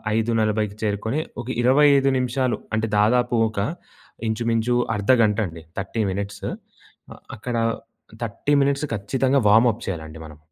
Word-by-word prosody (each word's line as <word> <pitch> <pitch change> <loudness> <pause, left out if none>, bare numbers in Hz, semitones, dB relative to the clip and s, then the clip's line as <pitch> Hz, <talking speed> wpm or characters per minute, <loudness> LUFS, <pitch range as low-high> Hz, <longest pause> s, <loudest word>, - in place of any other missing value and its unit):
5:40 110 -2 0
చేరుకొని, 110 +6 -1 0.2
ఒక 120 - -11
25 140 +2 +5
నిమిషాలు 130 0 0 0.2
అంటే 110 +1 0
దాదాపు 120 +2 +2
ఒక 105 - -5 0.7
ఇంచుమించు 115 +1 0 0.2
అర్ధగంట 105 0 +3
అండి, 80 -1 -11 0.2
30 100 +4 -2
మినిట్స్. 100 +1 -5 0.9
అక్కడ 120 +3 -4 0.7
30 115 +6 -2
మినిట్స్ 140 +1 0
ఖచ్చితంగా 130 +6 +1
వార్మ్ 115 +3 +6
అప్ 115 - -12
చేయాలండి 80 -3 -5
మనం. 75 -1 -12
115 Hz, 120 wpm, -23 LUFS, 105-125 Hz, 0.9 s, వార్మ్